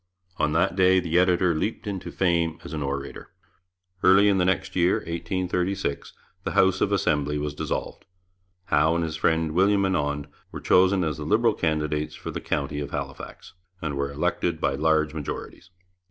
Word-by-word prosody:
On 75 Hz, -1 st, +1 dB
that 85 Hz, +4 st, +1 dB
day 95 Hz, 0 st, +4 dB
the 85 Hz, -1 st, +1 dB
editor 90 Hz, -1 st, +3 dB
leaped 105 Hz, +10 st, -3 dB
into 100 Hz, -3 st, -5 dB
fame 85 Hz, -3 st, +1 dB
as -, -, -8 dB
an 75 Hz, -, -3 dB
orator. 70 Hz, 0 st, -5 dB, 0.7 s
Early 95 Hz, +2 st, +6 dB
in 95 Hz, -1 st, +2 dB
the 90 Hz, -, +2 dB
next 95 Hz, 0 st, -1 dB
year 90 Hz, 0 st, +3 dB
(1836) 90 Hz, -1 st, -3 dB, 0.3 s
the -, -, -3 dB
House 95 Hz, -1 st, +3 dB
of 105 Hz, -, +2 dB
Assembly 75 Hz, -7 st, +1 dB
was 75 Hz, 0 st, -3 dB
dissolved. -, -, -4 dB, 0.6 s
Howe 80 Hz, 0 st, +2 dB
and 85 Hz, -, 0 dB
his 80 Hz, -1 st, -3 dB
friend 80 Hz, 0 st, +1 dB
William 100 Hz, +4 st, +3 dB
Annand 75 Hz, -6 st, -1 dB, 0.3 s
were -, -, -6 dB
chosen 95 Hz, 0 st, +3 dB
as 80 Hz, -1 st, -2 dB
the 75 Hz, -, -5 dB
Liberal 115 Hz, +7 st, +3 dB
candidates 75 Hz, -2 st, -1 dB
for -, -, -7 dB
the -, -, -5 dB
county 75 Hz, 0 st, -2 dB
of 70 Hz, -, -4 dB
Halifax, -, -, -7 dB, 0.3 s
and 80 Hz, -4 st, -3 dB
were 70 Hz, 0 st, -2 dB
elected 70 Hz, +1 st, -1 dB
by -, -, 0 dB
large 80 Hz, +1 st, +1 dB
majorities. 75 Hz, +2 st, -7 dB
80 Hz, 170 wpm, -25 LUFS, 75-95 Hz, 0.7 s, Early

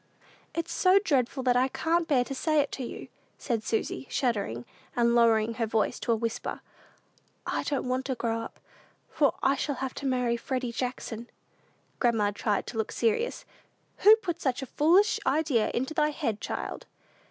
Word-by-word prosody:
It's 335 Hz, 0 st, -2 dB
so 370 Hz, +1 st, +5 dB
dreadful 270 Hz, -, +1 dB
that 250 Hz, -1 st, +3 dB
I 255 Hz, +1 st, +4 dB
can't 330 Hz, +4 st, 0 dB
bear 265 Hz, -5 st, +3 dB
to 275 Hz, -, -6 dB
say 310 Hz, +3 st, +1 dB
it 285 Hz, -1 st, +1 dB
to 265 Hz, -, -4 dB
you," -, -, -7 dB, 0.3 s
said 230 Hz, -3 st, -2 dB
Susy, 225 Hz, +4 st, -2 dB
shuddering, 200 Hz, -, -1 dB, 0.3 s
and 235 Hz, -1 st, +3 dB
lowering 230 Hz, -1 st, +4 dB
her 230 Hz, 0 st, -1 dB
voice 220 Hz, -1 st, 0 dB
to 235 Hz, -, -1 dB
a -, -, +4 dB
whisper; 225 Hz, 0 st, -3 dB, 0.8 s
"I -, -, -1 dB
don't 280 Hz, -3 st, -2 dB
want 255 Hz, +1 st, -1 dB
to 260 Hz, -, -1 dB
grow 230 Hz, -1 st, -1 dB
up, 230 Hz, -, -8 dB, 0.5 s
for 285 Hz, -3 st, +2 dB
I 270 Hz, -, +4 dB
shall 285 Hz, +1 st, -2 dB
have 265 Hz, 0 st, -4 dB
to 280 Hz, -, -4 dB
marry 250 Hz, -2 st, +1 dB
Freddy 255 Hz, 0 st, -3 dB
Jackson." 240 Hz, -1 st, -4 dB, 0.7 s
Grandma 225 Hz, -4 st, +2 dB
tried 205 Hz, 0 st, -1 dB
to 225 Hz, -, -5 dB
look 220 Hz, -, -1 dB
serious. 460 Hz, -, 0 dB, 0.5 s
"Who 425 Hz, +2 st, +8 dB
put 355 Hz, -7 st, -4 dB
such 260 Hz, 0 st, -1 dB
a 260 Hz, -, -10 dB
foolish 355 Hz, +8 st, +4 dB
idea 290 Hz, -8 st, +2 dB
into 265 Hz, +5 st, -2 dB
thy 300 Hz, -1 st, +2 dB
head, 260 Hz, -9 st, -3 dB
child?" -, -, -5 dB
255 Hz, 175 wpm, -28 LUFS, 230-295 Hz, 0.8 s, Who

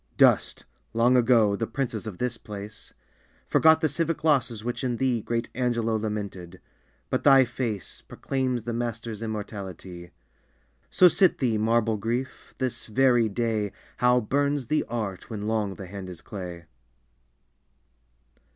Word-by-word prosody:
Dust, -, -, +3 dB, 0.3 s
long 120 Hz, +2 st, +4 dB
ago, 115 Hz, -4 st, +4 dB
the 115 Hz, +2 st, -2 dB
princes 115 Hz, -3 st, -3 dB
of 100 Hz, -5 st, -6 dB
this 125 Hz, -1 st, -1 dB
place; 105 Hz, -1 st, -9 dB, 0.6 s
Forgot 160 Hz, 0 st, +5 dB
the 160 Hz, -, +3 dB
civic 160 Hz, +1 st, -1 dB
losses 125 Hz, -8 st, +2 dB
which 120 Hz, +3 st, -3 dB
in 125 Hz, -2 st, -1 dB
thee 125 Hz, -3 st, +1 dB
Great 115 Hz, +2 st, -2 dB
Angelo 120 Hz, -3 st, 0 dB
lamented; 100 Hz, -5 st, -4 dB, 0.5 s
but -, -, 0 dB
thy 135 Hz, -2 st, +7 dB
face 115 Hz, -6 st, -4 dB
Proclaims 130 Hz, -3 st, -2 dB
the 120 Hz, +1 st, -3 dB
master's 115 Hz, -2 st, -4 dB
immortality! 95 Hz, -5 st, -6 dB, 0.8 s
So 185 Hz, -, +6 dB
sit 180 Hz, +1 st, +4 dB
thee, 115 Hz, -5 st, +1 dB
marble 115 Hz, 0 st, +2 dB
Grief! 120 Hz, +5 st, -4 dB
this 130 Hz, -2 st, -3 dB
very 120 Hz, -1 st, +3 dB
day 110 Hz, -2 st, -1 dB, 0.2 s
How 125 Hz, 0 st, +4 dB
burns 140 Hz, +3 st, 0 dB
the 155 Hz, -, +2 dB
art 110 Hz, -6 st, -4 dB
when 105 Hz, -3 st, -5 dB
long 105 Hz, -3 st, -1 dB
the 95 Hz, -, -8 dB
hand 95 Hz, 0 st, -8 dB
is 90 Hz, -2 st, -9 dB
clay 90 Hz, -4 st, -7 dB
115 Hz, 140 wpm, -26 LUFS, 105-125 Hz, 0.8 s, thy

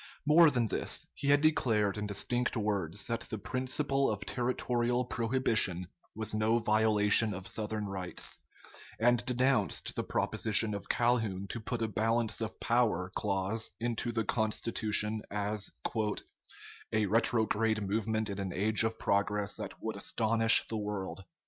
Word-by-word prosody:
More 155 Hz, +2 st, +7 dB
than 125 Hz, -5 st, +1 dB
this; 105 Hz, -, -3 dB
he 140 Hz, -, -5 dB
had 145 Hz, 0 st, +5 dB
declared 110 Hz, -10 st, +2 dB
in 105 Hz, 0 st, -3 dB
distinct 120 Hz, +5 st, -1 dB
words 100 Hz, -3 st, -2 dB
that 115 Hz, -1 st, -2 dB
the 110 Hz, -, -4 dB
principle 130 Hz, +5 st, 0 dB
of 100 Hz, -1 st, -4 dB
territorial 125 Hz, 0 st, -1 dB
prohibition 115 Hz, -7 st, 0 dB, 0.3 s
was 110 Hz, 0 st, -3 dB
no 110 Hz, +2 st, +2 dB
violation 110 Hz, -1 st, +3 dB
of 95 Hz, +1 st, -7 dB
Southern 110 Hz, -1 st, -3 dB
rights; 95 Hz, -2 st, -4 dB, 0.6 s
and 120 Hz, +1 st, +3 dB
denounced 125 Hz, -4 st, +1 dB
the -, -, -2 dB
proposition 110 Hz, 0 st, +1 dB
of 100 Hz, -, -7 dB
Calhoun 110 Hz, -6 st, 0 dB
to 120 Hz, -, -4 dB
put 115 Hz, +1 st, -3 dB
a -, -, 0 dB
"balance 115 Hz, +2 st, 0 dB
of 110 Hz, -, -5 dB
power" 110 Hz, -7 st, +1 dB
clause 100 Hz, +2 st, -1 dB
into 120 Hz, 0 st, -2 dB
the 115 Hz, -2 st, -1 dB
Constitution 110 Hz, 0 st, 0 dB
as 105 Hz, 0 st, -2 dB, 1.2 s
"a 110 Hz, -1 st, +1 dB
retrograde 110 Hz, 0 st, +2 dB
movement 110 Hz, +1 st, -1 dB
in 100 Hz, -, -5 dB
an 95 Hz, -2 st, -3 dB
age 105 Hz, +3 st, +4 dB
of 110 Hz, 0 st, -1 dB
progress 100 Hz, 0 st, 0 dB
that -, -, -8 dB
would -, -, -3 dB
astonish 115 Hz, 0 st, +4 dB
the 110 Hz, -, -3 dB
world." 100 Hz, -3 st, -5 dB
110 Hz, 140 wpm, -31 LUFS, 105-120 Hz, 1.2 s, More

